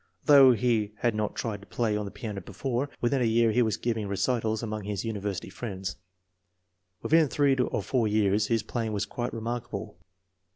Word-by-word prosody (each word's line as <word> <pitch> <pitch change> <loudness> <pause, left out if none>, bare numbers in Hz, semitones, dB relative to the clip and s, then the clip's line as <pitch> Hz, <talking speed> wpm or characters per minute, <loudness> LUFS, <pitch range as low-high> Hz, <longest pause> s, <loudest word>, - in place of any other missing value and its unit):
Although 140 -3 +8
he 110 -3 +1
had 120 -2 +2
not 105 -1 -2
tried 105 -3 -3
to 100 - -15
play 115 -3 0
on 105 0 -2
the - - -5
piano 105 -2 -6
before, 125 +8 -3
within 125 +2 +1
a - - +3
year 115 0 +3
he 125 - +3
was 110 -3 +1
giving 115 -3 -2
recitals 110 +2 0
among 110 -2 -4
his 105 +1 -3
university 100 -4 -4
friends. 95 -2 -5 1.1
Within 160 -1 +4
three 140 0 +2
or 125 -1 -1
four 125 -5 +1
years 105 -1 +2
his 115 -2 +1
playing 110 -1 -3
was 100 0 -1
quite 120 +4 -4
re 115 - -6
markable. 120 +1 -5
110 Hz, 190 wpm, -28 LUFS, 105-120 Hz, 1.1 s, Although